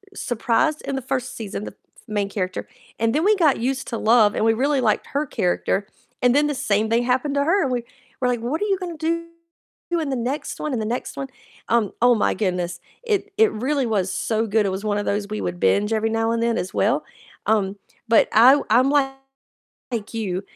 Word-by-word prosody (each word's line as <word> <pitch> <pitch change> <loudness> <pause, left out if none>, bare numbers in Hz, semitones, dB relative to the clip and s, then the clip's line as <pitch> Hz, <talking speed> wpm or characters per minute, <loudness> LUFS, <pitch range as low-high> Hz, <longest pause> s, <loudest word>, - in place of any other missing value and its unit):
surprised 255 - 0
in 275 - -3
the 270 - -2
1st 255 0 -3
season, 210 -2 -5
the - - -6
f - - -26
main 205 -2 -1
character 185 -2 -3 0.3
and 225 0 +1
then 310 +4 +1
we 425 +1 +5
got 320 -8 +3
used 265 +3 -2
to 230 - -3
Love, 220 -2 +4
and - - +1
we 225 - +4
really 275 +4 +1
liked 220 -4 +1
her 285 +2 -1
character, 195 0 0 0.4
and 245 -1 +4
then 295 +2 +3
the 295 - -2
same 215 -2 0
thing 230 +2 +2
happened 255 +3 0
to 280 - +2
her, 360 +7 +2
and 265 - 0
we 245 -1 -1 0.4
were 250 - +2
like, 245 -1 0
"What 260 - -3
are - - +1
you 390 -2 +1
gonna 350 -3 -5
do 335 +2 -1 0.6
in 325 -4 0
the 265 - -1
next 255 +4 -3
one 300 - -2
and 245 -4 -1
the 215 - -2
next 240 +3 -4
one?" 270 - -3 0.4
Um, 225 -4 +2
oh 245 0 +6
my 215 - +1
goodness, 180 -4 -2 0.2
it 415 -3 -1
it 440 0 +5
really 265 +4 -1
was 200 -4 0
so 225 0 -1
good. 215 0 +2
It 195 - +1
was 190 +3 -4
one 205 -1 0
of 205 - -2
those 205 0 -1
we 215 +1 -4
would 175 0 -3
binge 210 +2 +2
every 220 0 +1
now 225 0 0
and 230 - 0
then 230 0 +1
as 185 - -4
well. 250 +10 +1 0.4
Um, 205 -3 +1 0.3
but 225 0 +4
I 260 +6 +7
I'm 250 +5 +4
like 270 -1 -1 0.7
you, 195 -5 -2
235 Hz, 225 wpm, -22 LUFS, 215-280 Hz, 0.7 s, I